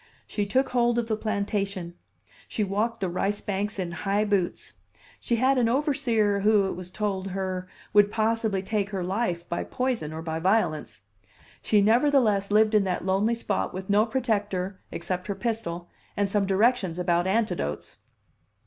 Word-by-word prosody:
She 205 -1 -2
took 260 +6 +2
hold 240 -1 +2
of 235 -1 0
the 220 - 0
plantation, 200 -4 -2 0.5
she 215 - -1
walked 215 +3 -1
the 190 - +1
rice 195 +3 -1
banks 205 +1 -3
in 180 -3 -3
high 200 +4 0
boots. 200 -4 -1 0.4
She 235 - 0
had 260 +3 +3
an 230 -2 +3
overseer, 240 -7 +1
who, 210 0 +4
it 190 - -1
was 180 0 -7
told 195 -1 -2
her, 185 -1 -3 0.3
would 205 -1 +6
possibly 220 -3 0
take 205 0 -1
her 195 -3 -3
life 180 -3 -2
by 170 - -2
poison 250 - -2
or 160 +1 -6
by 160 -1 -3
violence. 160 - 0 0.6
She 210 -2 +3
nevertheless 225 -3 +3
lived 215 +1 +4
in 210 -2 +5
that 180 -1 -2
lonely 200 +5 +2
spot 205 -5 -2
with 190 +1 -4
no 210 +3 +4
protector 205 -6 -1
except 180 +1 -3
her 200 - -2
pistol 195 -6 -3 0.3
and 200 0 +2
some 195 0 0
directions 195 -3 +2
about 175 0 +1
antidotes. 190 - -1
205 Hz, 165 wpm, -26 LUFS, 185-225 Hz, 0.6 s, would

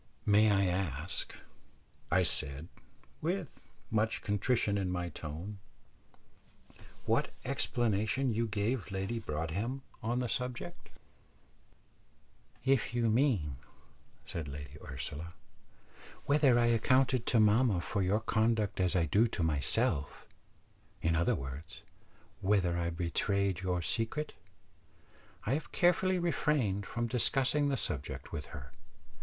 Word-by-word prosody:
"May 105 +1 +5
I 100 -1 +3
ask," 90 -3 -2 0.7
I - - +4
said, 70 +5 0 0.5
with 175 0 -4 0.2
much 110 0 0
contrition 105 +1 +1
in 95 -2 0
my 90 -1 -2
tone, 85 +7 -7 1.5
"what - - +2 0.2
explanation 115 +2 0
you 115 +2 0
gave 105 +3 -1
Lady 95 +4 -2
Broadhem 100 - -3 0.2
on 120 +1 -1
the 125 -1 0
subject?" 125 +9 -4 1.8
"If 130 -3 +2
you 115 -2 +2
mean," 110 - +2 0.7
said 80 -3 -5
Lady 70 0 -8
Ursula, 75 +4 -6 0.9
"whether 140 -4 +4
I 120 - +4
accounted 125 +2 +3
to 115 - +3
mamma 110 -1 +4
for 100 +4 -2
your 100 +4 +2
conduct 110 -2 +1
as 90 -1 +2
I 85 -2 +3
do 105 +10 +4
to 90 - -2
myself 75 -1 0 0.8
in 80 0 +2
other 85 +1 +2
words, 70 +4 -7 0.6
whether 95 -3 +2
I 85 0 0
betrayed 95 +3 0
your 90 -2 -1
secret 115 - 0 1.1
I 115 - +1
have 150 +2 -3
carefully 180 +1 +3
refrained 145 - 0
from 120 0 -2
discussing 135 +4 +2
the 135 - 0
subject 70 - -4
with - - -5
her. 65 -1 -9
105 Hz, 115 wpm, -32 LUFS, 85-120 Hz, 1.8 s, May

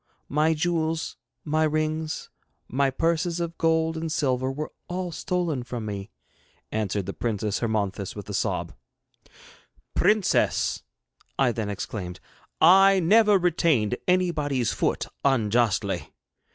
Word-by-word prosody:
My 155 +3 +2
jewels, 165 0 -1 0.3
my 155 +1 +1
rings, 155 0 -1 0.4
my 140 +2 +1
purses 165 +4 0
of 170 -1 -3
gold 160 0 +2
and 160 0 -3
silver 130 -4 0
were 150 +3 -5 0.2
all 180 0 -3
stolen 170 -4 -1
from 120 -2 -5
me,' 100 0 -5 0.6
answered 105 -3 -1
the - - -4
Princess 110 -3 -2
Hermonthis 100 -4 -2
with - - -8
a - - -6
sob. - - -1 1.2
'Princess,' 210 -2 +2 0.6
I 135 -3 +3
then 110 -3 -3
exclaimed, 95 -2 -5 0.4
'I 195 +3 +7
never 210 +4 +5
retained 160 - +2
anybody's 150 -9 +1
foot - - 0 0.2
unjustly. 120 -5 +1
155 Hz, 115 wpm, -25 LUFS, 115-170 Hz, 1.2 s, I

